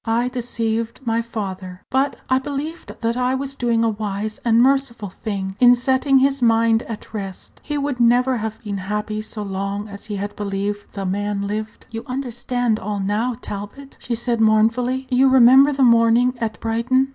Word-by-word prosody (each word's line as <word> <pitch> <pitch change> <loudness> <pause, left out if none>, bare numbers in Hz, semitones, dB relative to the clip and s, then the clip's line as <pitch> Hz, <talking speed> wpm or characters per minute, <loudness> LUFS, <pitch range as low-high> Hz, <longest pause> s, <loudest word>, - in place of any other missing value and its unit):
I 235 +2 0
deceived 230 -2 -2
my 230 0 +1
father; 190 -5 -6
but 270 +2 +1
I 260 0 +3
believed 290 +4 -6
that 230 0 0
I 250 +1 +1
was 275 +1 -3
doing 235 -3 +1
a 230 - +3
wise 210 0 -4
and 230 -1 +3
merciful 255 -5 +2
thing 190 0 -5
in 245 0 +7
setting 265 +2 +2
his 275 0 +2
mind 230 -1 +3
at 225 0 -8
rest. 195 -3 -7
He 295 -1 -3
would 285 -2 -2
have - - -2
never 240 -2 +2
been 205 -2 -4
happy 210 +2 -3
so 215 0 -6
long 200 +1 -3
as 200 -1 -10
he 210 -1 -5
had 205 +1 -4
believed 205 0 -3
the 195 -2 -4
man 200 +1 -2
lived. 215 +2 -5
You 225 0 -5
understand 245 -3 -1
all 205 0 -3
now, 210 +5 -1
Talbot," 205 +7 -8
she 240 - -3
said 235 0 -1
mournfully. 230 +4 +2
"You 260 +2 +5
remember 265 +2 +7
the 275 -1 +1
morning 235 +1 +4
at 220 -2 -3
Brighton?" 245 +4 +1
230 Hz, 180 wpm, -21 LUFS, 210-255 Hz, -, in